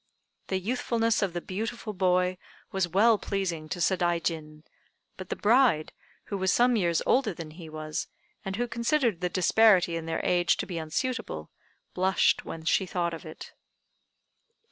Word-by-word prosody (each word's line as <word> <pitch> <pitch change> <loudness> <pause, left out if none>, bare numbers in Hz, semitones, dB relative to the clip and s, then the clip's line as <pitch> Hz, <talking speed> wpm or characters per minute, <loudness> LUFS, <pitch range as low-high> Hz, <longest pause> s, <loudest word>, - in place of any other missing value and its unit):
The 190 - 0
youthfulness 230 +2 0
of 195 -4 0
the 175 - -3
beautiful 220 +4 -4
boy 180 -1 +1 0.3
was 190 -2 0
well 210 +5 +4
pleasing 175 -6 -3
to 180 - -4
Sadaijin; 165 -4 -1 0.5
but 185 -1 -9
the - - -2
bride, 225 - +3 0.3
who 200 - -5
was 190 0 +2
some 245 0 +4
years 170 -6 +1
older 235 -8 +2
than 160 -2 -8
he 160 0 -10
was, 155 0 -4 0.4
and 195 -2 -4
who 240 +3 -1
considered 235 - 0
the 180 - 0
disparity 185 -1 +4
in 165 -1 -5
their 165 - -1
age 175 -1 +2
to - - -2
be 175 -3 -4
unsuitable, 160 - -3 0.4
blushed 190 +1 +2
when 160 -1 -8
she 190 +2 +2
thought 170 -1 -1
of 165 0 -8
it. 155 - -10
185 Hz, 160 wpm, -28 LUFS, 165-220 Hz, 0.5 s, well